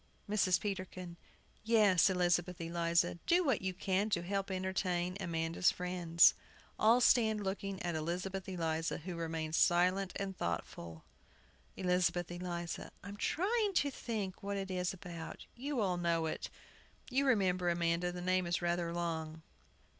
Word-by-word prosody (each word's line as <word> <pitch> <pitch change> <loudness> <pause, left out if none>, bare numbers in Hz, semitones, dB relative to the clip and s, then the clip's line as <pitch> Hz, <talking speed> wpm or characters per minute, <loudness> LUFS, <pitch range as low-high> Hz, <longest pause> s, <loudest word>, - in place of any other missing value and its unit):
MRS. 200 -3 +3
PETERKIN. 185 -3 -5 0.5
Yes, 210 -5 +5
Elizabeth 180 -1 +1
Eliza, 170 0 +1
do 355 +2 +4
what 265 - +1
you 190 0 -1
can 190 +3 0
to 175 -5 0
help 195 +2 -2
entertain 185 -1 -1
Amanda's 165 -1 +1
friends. 180 -2 +4 0.5
[All 225 +3 +6
stand 220 -4 +4
looking 195 0 -3
at 175 -1 -1
ELIZABETH 180 +4 -3
ELIZA, 165 -3 -1
who 180 -2 -4
remains 160 -1 -2
silent 180 +2 +3
and 195 -1 -3
thoughtful. 85 - -5 0.3
] - - -32
ELIZABETH 180 -1 +1
ELIZA. 175 -1 -4
I'm 200 +1 -7
trying 405 - 0
to 285 -4 +2
think 210 -7 -4
what 200 0 -3
it 195 -1 -4
is 180 -1 0
about. 170 -3 -8
You 265 0 -2
all 185 -3 +1
know 170 -2 +1
it. 160 - -3 0.6
You 275 +2 +2
remember, 185 -7 +2
Amanda, 170 +1 +1
the 175 0 -6
name 185 0 +1
is 170 - 0
rather 175 -1 -1
long. 160 -2 -3
180 Hz, 145 wpm, -34 LUFS, 170-195 Hz, 0.6 s, All